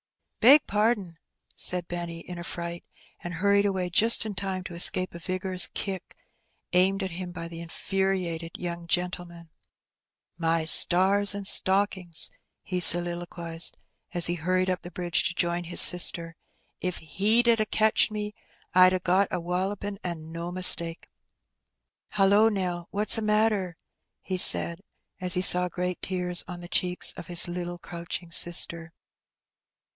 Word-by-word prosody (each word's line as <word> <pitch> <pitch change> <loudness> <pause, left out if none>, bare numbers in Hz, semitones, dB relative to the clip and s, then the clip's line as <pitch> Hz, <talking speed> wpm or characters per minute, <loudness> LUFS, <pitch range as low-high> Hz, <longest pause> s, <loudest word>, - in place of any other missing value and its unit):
''Beg 280 +6 +6
pardon," 205 -5 -3 0.4
said 180 -1 -1
Benny, 170 -1 -7
in 175 0 -11
a - - -9
fright, 170 0 -7 0.4
and 175 0 -9
hurried 200 +3 0
away 185 -2 -4
just 225 +5 +3
in 215 - -6
time 190 -1 -6
to 180 - -11
escape 185 +2 0
a 170 - -11
vigorous 185 0 0
kick 190 -3 -7 0.6
aimed 190 +2 0
at 190 - -6
him 180 +1 -8
by 165 -1 -9
the 165 0 -10
infuriated 175 -1 -5
young 170 -1 -8
gentleman. 175 -2 -5 0.5
" - - -64
My 165 -1 -1
stars 195 +5 +6
and 200 -1 -7
stockings! 190 -3 0 0.2
" - - -56
he 180 -1 -5
soliloquized, 175 -1 +2 0.4
as 175 - +4
he 175 - 0
hurried 185 +2 -2
up 180 - -5
the 175 - -11
bridge 175 -1 -3
to 175 - -7
join 175 0 -3
his 175 - +1
sister. 170 -1 +5 0.5
''If 180 -1 -5
he 205 +9 +2
'ad 230 -1 +3
a 215 - 0
catched 220 +1 +1
me, 210 -1 -7 0.4
I'd 185 0 +4
a 185 - -2
got 185 +2 0
a 180 - -5
walloping, 195 +3 -5
an' 160 -3 -8
no 170 +1 -7
mistake. 170 -2 +2 1.0
Hullo, 205 +2 +2
Nell! 180 -4 -5
what's 210 +2 +1
a - - -6
matter?" 210 -5 -2 0.5
he 185 -1 -5
said, 170 0 +6 0.4
as 180 -1 +7
he 180 - -1
saw 180 -1 +6
great 180 +1 -6
tears 180 -2 -3
on 175 -2 -10
the 175 - -11
cheeks 180 0 -1
of 165 - -12
his 175 0 +3
little 175 0 -7
crouching 170 0 -9
sister. 170 -1 -2
180 Hz, 155 wpm, -24 LUFS, 170-195 Hz, 1.0 s, as